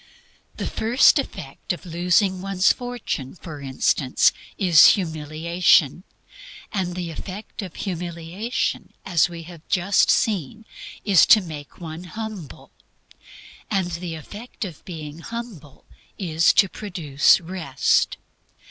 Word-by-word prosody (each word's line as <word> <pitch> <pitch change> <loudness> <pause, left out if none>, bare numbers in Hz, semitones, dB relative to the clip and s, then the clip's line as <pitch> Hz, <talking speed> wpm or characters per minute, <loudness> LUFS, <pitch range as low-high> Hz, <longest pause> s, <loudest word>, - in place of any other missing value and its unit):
The - - -3
first 245 +6 +4
effect 185 - -6
of 180 - -10
losing 180 +2 +1
one's 195 -1 +2
fortune, 245 - -5
for 155 -5 -9
instance, 130 0 +2 0.2
is 170 -7 +7
humiliation; 160 -1 +1 0.7
and 180 -3 -2
the 175 -2 -4
effect 195 +7 -8
of 185 -5 -8
humiliation, 175 +4 -4
as 175 -3 +2
we 170 -1 -8
have 170 -1 -12
just 190 +2 +2
seen, 205 - 0 0.4
is 195 -4 +5
to 220 - +8
make 150 -5 -9
one 165 0 -8
humble; 210 - -8 1.0
and 190 -3 -1
the 170 0 -5
effect 210 - -8
of 170 -6 -10
being 155 -3 -8
humble 215 - -9 0.3
is 165 -3 +3
to 205 - +5
produce 170 -9 +2
Rest. 165 -6 0
175 Hz, 115 wpm, -23 LUFS, 160-195 Hz, 1.0 s, to